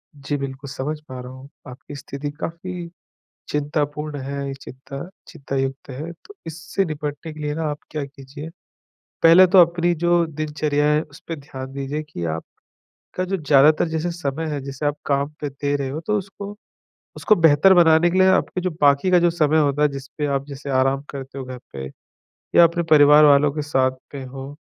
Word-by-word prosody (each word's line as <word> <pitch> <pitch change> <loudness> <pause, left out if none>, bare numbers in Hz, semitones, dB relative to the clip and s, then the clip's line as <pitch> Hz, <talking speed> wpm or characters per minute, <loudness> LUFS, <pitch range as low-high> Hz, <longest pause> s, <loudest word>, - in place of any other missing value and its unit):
जी 145 +1 -4
बिल्कुल, 135 0 -6
समझ 145 +3 -4
पा 130 -1 -7
रहा 125 +1 -9
हूँ। 130 +2 -12 0.2
आपकी 130 +3 -10
स्थिति 140 +1 -6
काफ़ी 170 +1 -5 0.6
चिंतापूर्ण 150 0 -2
हैं। 140 +1 -4
ये 135 - -4
चिंता 140 +4 -9 0.2
चिंतायुक्त 135 -3 -4
हैं, 150 +6 -6
तो 410 - -14
इससे 175 +4 -2
निपटने 150 -1 -5
के 155 - -11
लिए 150 0 -2
ना 160 - -3
आप 145 - -5
क्या 150 -2 -3
कीजिए 140 +3 -10 0.7
पहले 170 +3 +8
तो 185 +1 +4
अपनी 170 +1 +1
जो 175 +1 +2
दिनचर्या 150 -1 -1
हैं, 150 +1 +3
उस - - -15
पे 165 - -3
ध्यान 135 -2 -9
दीजिए 140 +2 -4
कि 145 - -7
आपका 80 0 -6 0.6
जो 195 +1 -2
ज़्यादातर 150 +1 +4
जैसे 160 +2 -2
समय 160 -2 -3
है, 145 - -2
जिसे 140 +2 -6
आप 145 - +1
काम 140 0 0
पे 145 - -2
दे 140 +1 -2
रहे 140 -2 -2
हो, 150 +4 -4
तो 210 +5 -1
उसको 200 +1 -7 0.6
उसको 215 - +3
बेहतर 165 +1 +5
बनाने 170 0 +5
के 185 - 0
लिए 185 - +6
आपके 190 -1 +1
जो 185 - -1
बाकी 145 +5 +4
का 180 - +6
जो 175 0 +3
समय 155 -2 +2
होता 145 -1 +2
हैं, 150 - +4
जिस 135 -1 -7
पे 150 - 0
आप 140 -1 -1
जैसे 140 0 -7
आराम 135 +1 +2
करते 135 0 -8
हो 135 - -5
घर 130 0 -8
पे 65 -1 -6 0.7
या 170 - +8
अपने 170 +1 +1
परिवार 150 0 +7
वालों 145 0 +5
के 150 0 -3
साथ 130 -3 +1 0.2
में 135 -2 -6
हो, 135 +2 -9
145 Hz, 195 wpm, -22 LUFS, 140-165 Hz, 0.7 s, पहले